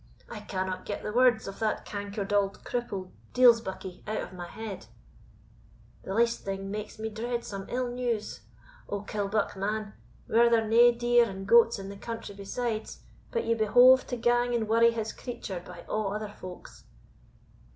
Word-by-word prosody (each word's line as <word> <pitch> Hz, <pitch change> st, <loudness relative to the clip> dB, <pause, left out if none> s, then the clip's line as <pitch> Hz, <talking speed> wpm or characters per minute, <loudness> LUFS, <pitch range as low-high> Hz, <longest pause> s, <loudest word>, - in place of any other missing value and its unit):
I -, -, -7 dB
cannot 185 Hz, -1 st, -4 dB
get 205 Hz, -, -4 dB
the 210 Hz, -, -4 dB
words 245 Hz, -2 st, +4 dB
of 195 Hz, -, -7 dB
that 220 Hz, -1 st, -1 dB
cankered 205 Hz, 0 st, -4 dB
auld 200 Hz, -1 st, +1 dB
cripple 200 Hz, -7 st, -4 dB, 0.2 s
deil's 245 Hz, -2 st, +7 dB
buckie 190 Hz, -3 st, -7 dB
out 215 Hz, -3 st, -3 dB
o' -, -, -10 dB
my 175 Hz, -1 st, -6 dB
head 220 Hz, -2 st, -7 dB, 1.1 s
the 190 Hz, -, -5 dB
least 235 Hz, +1 st, +2 dB
thing 195 Hz, 0 st, -4 dB
makes 210 Hz, +1 st, -5 dB
me 220 Hz, 0 st, -3 dB
dread 235 Hz, +2 st, -3 dB
some 195 Hz, -1 st, -6 dB
ill 250 Hz, 0 st, -1 dB
news. 240 Hz, -3 st, -2 dB, 0.5 s
O, 200 Hz, -1 st, -2 dB
Killbuck, 205 Hz, 0 st, -1 dB
man! 210 Hz, +2 st, -3 dB, 0.3 s
were 235 Hz, +1 st, +5 dB
there 225 Hz, -2 st, +3 dB
nae 235 Hz, +2 st, +7 dB
deer 240 Hz, 0 st, +3 dB
and 195 Hz, 0 st, -7 dB
goats 230 Hz, +2 st, +6 dB
in 195 Hz, 0 st, -7 dB
the 200 Hz, -, -8 dB
country 230 Hz, -1 st, -6 dB
besides, 215 Hz, +3 st, -4 dB, 0.3 s
but 470 Hz, -, -2 dB
ye 230 Hz, -, +2 dB
behoved 245 Hz, +4 st, +6 dB
to 245 Hz, -, -3 dB
gang 240 Hz, +1 st, +2 dB
and 225 Hz, -2 st, 0 dB
worry 230 Hz, +1 st, +5 dB
his 225 Hz, -1 st, -3 dB
creature, 200 Hz, -7 st, -6 dB
by -, -, -11 dB
a' -, -, -9 dB
other 210 Hz, 0 st, -2 dB
folk's?" 185 Hz, -3 st, -11 dB
220 Hz, 170 wpm, -28 LUFS, 200-235 Hz, 1.1 s, deil's